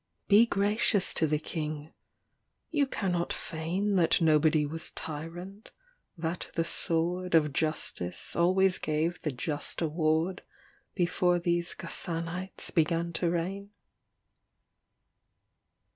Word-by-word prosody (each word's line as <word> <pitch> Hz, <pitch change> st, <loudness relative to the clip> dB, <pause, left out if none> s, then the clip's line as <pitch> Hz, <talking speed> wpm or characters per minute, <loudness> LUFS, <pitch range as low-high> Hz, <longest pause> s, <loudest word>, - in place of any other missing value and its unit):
LXXVX -, -, -47 dB
Be 210 Hz, +3 st, +7 dB
gracious 205 Hz, -1 st, +2 dB
to 160 Hz, -, +1 dB
the 150 Hz, 0 st, +1 dB
King. 155 Hz, 0 st, -5 dB, 0.8 s
You 290 Hz, -4 st, +2 dB
canot 180 Hz, -8 st, -1 dB
feign 185 Hz, +6 st, -2 dB
That 170 Hz, -3 st, +3 dB
nobody 155 Hz, -1 st, +3 dB
was 160 Hz, +2 st, -3 dB
tyrant, 175 Hz, +7 st, -8 dB, 0.5 s
that 165 Hz, +1 st, -4 dB
the 165 Hz, -, +1 dB
sword 175 Hz, +2 st, -1 dB
Of 150 Hz, -3 st, +3 dB
justice 140 Hz, -, -2 dB
always 185 Hz, +2 st, +3 dB
gave 160 Hz, +3 st, -1 dB
the 150 Hz, -, -2 dB
just 145 Hz, +3 st, -2 dB
award 160 Hz, +2 st, 0 dB, 0.5 s
Before 175 Hz, -1 st, +2 dB
these 170 Hz, 0 st, -1 dB
Ghassanites 170 Hz, +2 st, 0 dB
began 165 Hz, +1 st, +1 dB
to 170 Hz, 0 st, +1 dB
reign. 190 Hz, +4 st, -3 dB
170 Hz, 110 wpm, -29 LUFS, 160-180 Hz, 0.8 s, Be